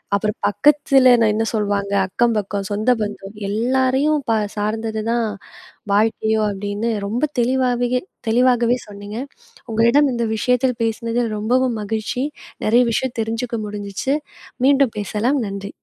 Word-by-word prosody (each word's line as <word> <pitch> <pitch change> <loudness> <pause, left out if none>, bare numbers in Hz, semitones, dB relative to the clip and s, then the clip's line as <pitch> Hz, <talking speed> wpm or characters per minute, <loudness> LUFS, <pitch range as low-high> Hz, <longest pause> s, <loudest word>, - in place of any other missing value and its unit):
அப்புறம் 210 +1 -1
பக்கத்துல 265 +4 +4 0.2
என்ன 220 +1 0
சொல்வாங்க, 200 -2 -1
அக்கம் 235 +3 +1
பக்கம், 200 -1 -3
சொந்த 215 +5 +2
பந்தம், 205 -1 -5
எல்லாரையும் 260 +6 +1
ப - - +3 0.3
சார்ந்தது 220 +1 -2
தான் 235 -1 +1 0.7
வாழ்க்கையோ 220 +1 +2
அப்படின்னு 205 +3 -3 0.2
ரொம்ப 235 +7 -2 0.2
தெளிவாவே 245 0 +1 0.4
தெளிவாகவே 240 +1 +3
சொன்னீங்க, 205 +1 -8 0.5
உங்களிடம் 235 +6 +4
இந்த 235 -1 -1
விஷயத்தில் 250 +2 +1
பேசினதில் 230 0 -1
ரொம்பவும் 245 +2 +1
மகிழ்ச்சி, 220 +4 -2 0.4
நிறைய 235 +3 +5
விஷயம் 255 +2 -2
தெரிஞ்சுக்க 230 +2 -3
முடிஞ்சிச்சு, 205 +5 -3 0.5
மீண்டும் 275 -4 +3
பேசலாம் 210 +3 -1 0.2
நன்றி. 200 0 -6
225 Hz, 120 wpm, -20 LUFS, 210-250 Hz, 0.7 s, நிறைய